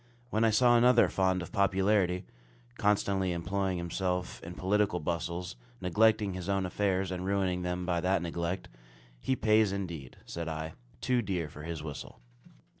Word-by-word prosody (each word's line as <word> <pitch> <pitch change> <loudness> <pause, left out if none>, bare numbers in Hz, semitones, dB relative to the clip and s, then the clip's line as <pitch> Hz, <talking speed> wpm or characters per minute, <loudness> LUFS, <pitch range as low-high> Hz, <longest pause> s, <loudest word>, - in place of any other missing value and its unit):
When 110 +2 +2
I 115 - +5
saw 120 +2 +5
another 125 0 +5
fond 95 -1 +1
of - - -9
popularity, 95 -1 +2 0.5
constantly 100 -2 +2
employing 95 +2 -1
himself 90 +1 -2
in 85 +1 -8
political 100 -1 +1
bustles, 85 +1 -3 0.2
neglecting 105 +2 +3
his 90 0 -5
own 95 -1 +1
affairs, 95 0 0
and 90 0 -3
ruining 95 -2 0
them 90 0 -2
by 85 -1 0
that 90 -1 +1
neglect, 85 +2 -3 0.5
"He 130 - 0
pays, 110 -3 +3
indeed," 85 -9 -5
said 85 -1 -5
I, 80 0 -4 0.3
"too 125 -1 +2
dear 90 -7 -2
for 75 - -10
his 80 -1 -5
whistle." 75 -3 -7
95 Hz, 155 wpm, -30 LUFS, 85-100 Hz, 0.5 s, I